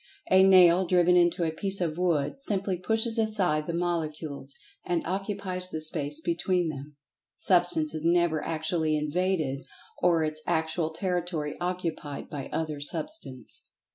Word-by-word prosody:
A 190 0 +7
nail 185 -1 +6
driven 180 0 +4
into 175 0 +3
a 160 - 0
piece 195 +4 +3
of 165 -4 -1
wood, 170 - -1
simply 195 -5 0
pushes 225 +5 +1
aside 190 -9 +2
the 170 - -2
molecules, 155 -5 -3 0.3
and 175 -2 -1
occupies 190 -1 -3
the 160 - -4
Space 150 -1 -2
between 175 0 0
them. 145 0 -8 0.4
Substance 175 -4 +2
is 155 -1 -4
never 170 -2 +2
actually 160 -1 0
"invaded" 150 -3 -1 0.4
or 170 -2 +3
its 155 0 -2
actual 160 -1 0
territory 170 -3 -3
occupied 175 -5 -4
by 140 -3 -6
other 155 -2 -3
Substance. 145 - -4
170 Hz, 140 wpm, -27 LUFS, 155-185 Hz, 0.4 s, A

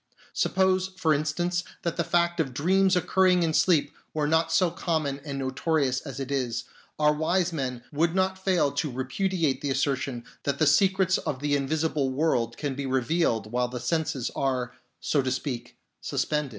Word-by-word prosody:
Suppose, 190 0 +2
for 160 -2 +3
instance, 175 +4 -1 0.2
that 170 - -1
the 170 - 0
fact 170 0 +1
of 135 -6 -1
dreams 190 +6 +3
occurring 180 0 +3
in 160 -1 0
sleep 155 -4 +3 0.2
were 150 -1 +1
not 160 +1 +2
so 170 +1 +3
common 155 -6 -1
and 140 -2 -5
notorious 135 0 0
as 140 -2 -7
it 135 0 -4
is, 125 -3 -1 0.3
our 150 0 +4
wise 170 +3 0
men 125 -5 -3
would 165 +3 +1
not 190 0 0
fail 180 -7 +2
to 145 +2 -1
repudiate 140 +2 -1
the 145 - -2
assertion 135 -2 -1 0.2
that 140 -1 -1
the 155 - +3
secrets 190 +4 +3
of 130 - -3
the 145 0 +1
invisible 145 0 0
world 130 -5 0
can 145 -3 -2
be 135 0 -4
revealed 130 -5 0
while 125 0 +1
the 125 0 -6
senses 155 0 -1
are, 130 -2 -1 0.3
so 145 - +1
to 130 - -1
speak, 125 -2 -4 0.2
suspended. 150 -2 -1
150 Hz, 175 wpm, -27 LUFS, 135-170 Hz, 0.3 s, our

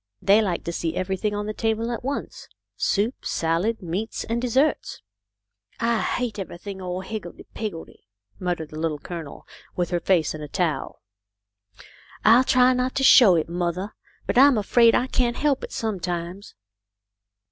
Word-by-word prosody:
They 200 +3 +4
like 190 -5 -2
to 170 - -3
see 165 -1 -2
everything 190 +3 -2
on 205 0 -3
the 215 - -3
table 225 +1 -1
at 235 - -5
once, 275 +2 -5 0.3
soup, 215 +6 -1
salad, 180 +7 -1
meats, 185 +6 -3
and 230 +1 -2
desserts." 260 +5 0 0.4
" - - -40
I 230 -1 +1
hate 240 -4 -2
everything 190 +1 -7
all 180 0 -4
higgledy 190 -3 -7
piggledy! 195 - -7 0.2
" 100 0 -37
mut 180 -2 -1
tered 160 -2 -7
the 155 - -8
Little 160 -2 -1
Colonel, 160 -1 -8 0.3
with 175 0 -1
her 175 - +1
face 170 -3 +1
in 155 - -7
a 150 - -6
towel. 160 -4 -2 1.2
"I'll 230 +4 +7
try 255 0 +4
not 255 +1 -1
to 270 - 0
show 225 -8 +8
it, 160 - 0
mothah, 175 +3 -3 0.3
but - - +2
I'm 275 -2 +7
afraid 230 +3 +4
I 250 - +2
can't 250 -2 0
help 285 -2 +1
it - - -6
sometimes." 180 -2 -4
200 Hz, 170 wpm, -24 LUFS, 175-230 Hz, 1.2 s, show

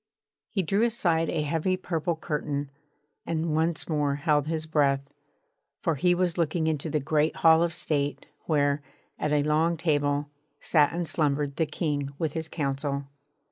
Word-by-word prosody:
He 195 - 0
drew 200 +6 +1
aside 175 -9 +1
a 150 - 0
heavy 165 +5 0
purple 170 -2 -2
curtain, 145 -2 -3 0.5
and 165 -1 -1
once 160 +1 +1
more 150 -3 +1
held 145 0 +1
his 160 -1 -1
breath; 140 -3 +1 0.7
for 165 - 0
he 175 +5 +2
was 175 -1 0
looking 165 0 +1
into 160 0 -1
the 150 - +1
great 150 +2 +1
Hall 160 0 +5
of 170 -1 +2
State 145 -3 -2 0.2
where, 145 -2 +2 0.4
at 150 - -1
a 145 -1 +3
long 160 +3 +2
table, 145 -2 +1 0.3
sat 150 -3 +3
and 170 0 -2
slumbered 145 -3 0
the 160 - +1
King 145 -3 -2
with 160 -3 -1
his 160 -1 -3
Council. 140 -2 -2
155 Hz, 160 wpm, -27 LUFS, 145-165 Hz, 0.7 s, Hall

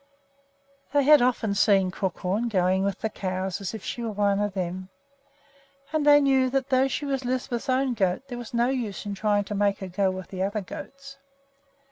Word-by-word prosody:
They 285 -1 +4
had 295 0 +7
often 240 -4 +1
seen 195 -2 +3
Crookhorn 190 +4 -2
going 190 -2 +2
with 200 -1 -2
the 220 - -1
cows 185 0 -3
as 195 +2 -4
if 215 - -8
she 240 - -4
were 230 - -2
one 205 -1 +1
of 205 -1 -1
them; 185 0 -4 1.0
and 305 -2 +1
they 290 0 +8
knew 265 -2 +3
that 270 +1 -1
though 260 0 +3
she 290 +2 -3
was 270 -2 -2
Lisbeth's 250 0 -3
own 260 0 +2
goat 190 0 0
there 245 -2 -6
was 240 - -8
no 240 +1 +1
use 235 -7 -3
in 205 - -3
trying 205 0 +1
to 205 - -6
make 200 -1 +1
her 190 - -6
go 190 +2 0
with 185 -1 -6
the 185 -1 -5
other 205 +2 -1
goats. 275 - -10
210 Hz, 200 wpm, -26 LUFS, 190-260 Hz, 1.0 s, they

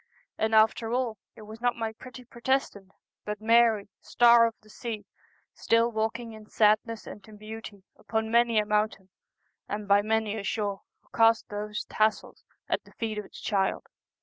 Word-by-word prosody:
And 220 0 +1
after 220 +1 +3
all, 240 -4 -1 0.2
it 215 - -12
was 220 +2 -11
not 245 0 +1
my 225 -1 -3
pretty 250 +2 -12
Protestant, 235 -5 -2 0.3
but 210 0 -5
Mary, 225 -2 +4
Star 235 -1 +5
of 230 - -6
the - - -20
Sea, 215 -2 -6 0.5
still 230 +1 +2
walking 225 +1 -3
in 215 -1 -13
sadness 215 +1 +2
and 205 - -10
in 215 -1 -13
beauty 215 -2 -9
upon 220 0 -3
many 235 -1 +3
a 210 - +3
mountain 210 -2 -1 0.6
and 205 0 -4
by 200 +1 +5
many 220 0 0
a - - -6
shore, 200 -1 -2 0.2
who - - -31
cast 225 0 +4
those 210 +1 -4
tassels 215 0 -1 0.2
at - - -1
the - - -20
feet 220 -2 -3
of 210 - -6
the - - -16
child. 195 -2 -1
220 Hz, 175 wpm, -27 LUFS, 210-230 Hz, 0.6 s, Star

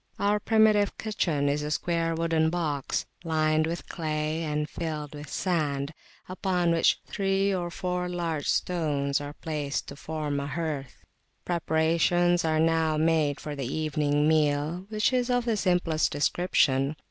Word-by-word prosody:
Our 205 +1 +2
primitive 215 -2 +3
kitchen 165 -10 -1
is 145 +1 +1
a 150 - -3
square 165 +1 0
wooden 165 -1 +1
box, 155 -5 -2 0.2
lined 155 -1 +2
with 170 +1 -4
clay, 155 -1 -2
and 150 -1 -1
filled 155 -3 -5
with 145 -1 -8
sand, 150 -5 -1 0.3
upon 180 -2 0
which 165 -1 +3
three 195 0 0
or 175 -2 -2
four 180 0 -2
large 170 -4 -2
stones 145 -5 0
are 145 0 -6
placed 150 -3 -3
to 140 - -8
form 150 -1 -3
a 140 - -3
hearth. 145 -3 -4 0.4
Preparations 170 +1 +2
are 155 -1 +1
now 160 -1 +2
made 155 -2 +2
for 150 -1 -5
the 135 -2 -4
evening 150 -1 +1
meal, 155 +3 +1
which 215 +3 +1
is 250 0 +1
of 245 -1 +1
the 230 -2 +1
simplest 175 -5 +1
description. 145 -2 +2
160 Hz, 145 wpm, -27 LUFS, 150-175 Hz, 0.4 s, primitive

